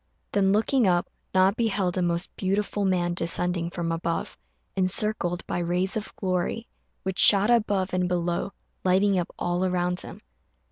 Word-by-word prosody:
Then, 195 -1 +2
looking 225 +3 +2
up, 175 -1 +2 0.2
Na 185 +1 +4
beheld 200 -5 -1
a 185 - 0
most 175 +1 -1
beautiful 200 +1 -1
man 175 -2 +1
descending 175 0 -1
from 170 -1 -3
above, 165 0 -3 0.4
encircled 185 -1 0
by - - -3
rays 180 +2 0
of 220 -1 -4
glory, 185 +4 -2 0.4
which 190 0 -3
shot 205 +1 +7
forth 240 -1 +6
above 195 -3 -2
and 180 0 +1
below, 175 +1 -1 0.3
lighting 190 +1 +3
up 175 - -3
all 175 +1 -1
around 180 -1 0
him. - - -9
185 Hz, 155 wpm, -26 LUFS, 175-195 Hz, 0.4 s, shot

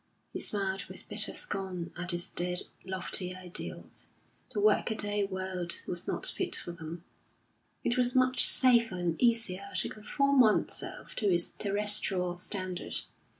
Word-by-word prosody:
He - - -4
smiled 195 -1 -1
with 185 - -9
bitter 210 +1 +2
scorn 185 -4 -5
at 175 0 -5
his 175 -1 0
dead, 180 0 -1 0.2
lofty 185 0 0
ideals. 180 -1 -7 0.4
The 220 - -3
workaday 205 -1 +2
world 185 -2 -3
was 175 -1 -3
not - - -2
fit - - -1
for 175 - -3
them; 170 0 -8 0.8
it 240 +1 0
was 245 0 +2
much 255 0 +4
safer 235 -6 +7
and 175 -2 -1
easier 220 -5 +1
to - - 0
conform 275 +6 0
oneself 220 -4 +1
to 210 - +1
its 175 -2 +2
terrestrial 200 -3 +1
standard. 185 0 -4
190 Hz, 140 wpm, -30 LUFS, 180-215 Hz, 0.8 s, safer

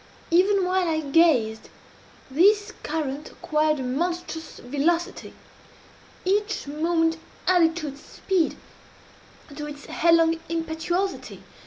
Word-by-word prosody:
Even 380 +2 +4
while 365 0 +1
I 315 -1 0
gazed, 275 -8 +2 0.6
this 410 +8 +4
current 300 -2 -3
acquired 305 -1 0
a - - -3
monstrous 325 +4 -3
velocity. 335 +8 -1 0.9
Each 415 +3 0
moment 325 +2 0 0.3
added 335 -3 +4
to 310 -4 -4
its 280 +1 -11
speed 370 -5 -1 1.0
to 295 0 -5
its 290 0 -9
headlong 330 0 +3
impetuosity. 335 +3 -3
330 Hz, 105 wpm, -25 LUFS, 300-355 Hz, 1.0 s, Even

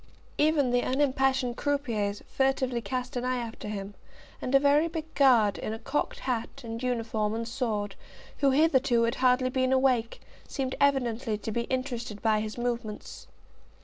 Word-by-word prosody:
Even 295 -4 +3
the 245 0 +3
unimpassioned 265 -2 +1
croupiers 230 -9 -1
furtively 265 -2 0
cast 250 +3 -4
an 245 - -2
eye 255 0 0
after 230 -3 -6
him, 200 -1 -5 0.5
and 255 - 0
a - - +8
very 290 +3 +4
big 320 -1 -6
Guard, 240 -7 +4
in 215 - -3
a - - -4
cocked 280 +5 -2
hat, 250 +1 -3
and 230 0 -6
uniform, 225 -4 -1
and 230 0 -3
sword, 220 -5 -2 0.5
who 280 - +4
hitherto 265 -4 +3
had 230 0 +1
hardly 255 0 +3
been 255 0 +1
awake, 260 -3 +2 0.3
seemed 265 -2 -3
evidently 245 -5 +1
to 220 - -5
be 235 +2 -1
interested 250 -4 -3
by 215 -1 +2
his 215 +1 -5
movements. 235 -3 -4
250 Hz, 160 wpm, -28 LUFS, 225-270 Hz, 0.5 s, a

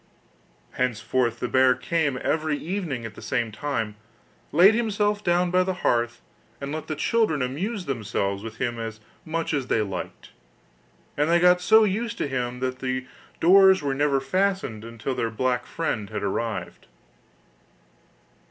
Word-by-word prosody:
Henceforth 125 -1 0
the 125 - -2
bear 130 0 +4
came 160 -6 0
every 155 -1 0
evening 160 - -4
at 115 - -7
the - - -12
same 120 -4 -1
time, 110 -3 -3 0.6
laid 190 +5 +7
himself 210 -2 0
down 175 0 +2
by 185 0 +4
the 185 0 -1
hearth, 120 0 +1 0.4
and 140 0 -5
let 155 0 -5
the 155 - -3
children 160 - +1
amuse 180 - -3
themselves 100 -6 -2
with 110 0 -8
him 120 -1 -2
as 110 -1 -5 0.3
much 165 0 -2
as 135 -4 -1
they 110 - +2
liked; 95 -2 -7 0.8
and 150 +2 +1
they 170 +1 +4
got 180 +1 +5
so 220 +4 +6
used 220 +3 -1
to - - -1
him 125 -2 -3
that 130 0 -2
the 130 -1 -2 0.3
doors 190 0 +6
were 140 -1 0
never 140 0 +2
fastened 185 - -1
until 115 +3 -4
their 115 -2 -1
black 125 +2 -1
friend 110 -11 -3
had - - -4
arrived. 110 +2 -3
140 Hz, 155 wpm, -25 LUFS, 120-180 Hz, 0.8 s, laid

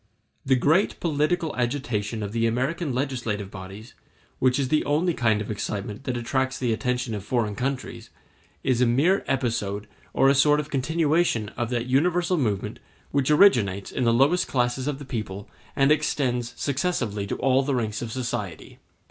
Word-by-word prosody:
] - - -45
The - - +7
great 155 - +2
political 160 +1 0
agitation 120 -4 -2
of 100 - -4
the 115 +1 +1
American 135 +7 -1
legislative 120 -7 -2
bodies, 100 +4 -10 0.5
which 130 0 +3
is 135 -3 0
the 155 +1 +2
only 165 +4 +1
kind 110 -6 +1
of 105 - -5
excitement 105 +2 -4
that 125 -2 -1
attracts 130 +2 -1
the 120 -3 0
attention 125 0 -2
of 105 -3 -4
foreign 110 -1 0
countries, 130 +3 -4 0.5
is 125 -2 +1
a 125 - +4
mere 155 +12 +3
episode 110 -6 -1 0.3
or 135 - +3
a 135 - +6
sort 150 +2 +4
of 150 - -5
continuation 150 -4 +1
of 120 0 -4
that 120 -1 -1
universal 175 +7 +2
movement 105 -8 -2 0.3
which 140 -1 +1
originates 120 - +4
in 130 - -1
the 115 - +4
lowest 145 +10 +3
classes 125 +1 0
of 145 -2 -1
the 145 - -9
people 105 -6 -5 0.3
and 135 +1 +4
extends 125 -5 0
successively 130 - -1
to - - -2
all 130 0 +3
the 135 0 -1
ranks 110 -4 -2
of 120 -2 -5
society. 115 -8 -5
125 Hz, 175 wpm, -25 LUFS, 110-145 Hz, 0.5 s, The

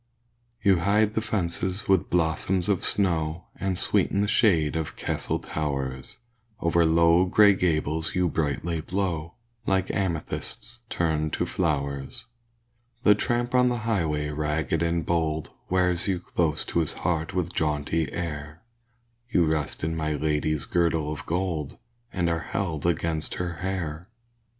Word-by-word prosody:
You 95 -3 +5
hide 105 +4 +3
the 110 - 0
fences 95 -2 -2
with 95 -3 +3
blossoms 90 +2 +1
of 100 -4 +1
snow, 85 -4 0
And 95 -2 -1
sweeten 100 - +2
the 105 - +1
shade 85 -9 +3
of 80 -2 -3
castle - - -1
towers; 70 -4 -3 0.4
Over 85 0 +3
low, 85 +2 +5
grey 100 +2 +6
gables 80 -3 0
you 90 -1 +3
brightly 80 +2 -1
blow, 85 -2 -2 0.3
Like 95 -1 +1
amethysts 95 +6 -3
turned 80 -2 0
to - - 0
flowers. 70 -4 -2 0.8
The 105 - +7
tramp 120 +4 -1
on 125 0 +5
the 120 - 0
highway 80 -9 0
ragged 75 +1 -1
and 85 -1 0
bold 80 -3 0 0.2
Wears 90 -1 +2
you 95 -3 +1
close 85 -3 0
to - - 0
his 80 - 0
heart 80 -1 -2
with 90 -1 -1
jaunty 75 +1 0
air; 75 -1 -5 0.7
You 90 -8 +3
rest 80 -1 -1
in 80 +1 0
my 80 -1 -1
lady's 75 0 0
girdle 80 -3 +1
of 75 - -9
gold, 85 -4 -2 0.3
And 90 -2 0
are 85 -1 +1
held 80 -3 -2
against 80 -2 0
her 85 -2 -3
hair. 90 -2 -4
85 Hz, 140 wpm, -26 LUFS, 75-95 Hz, 0.8 s, The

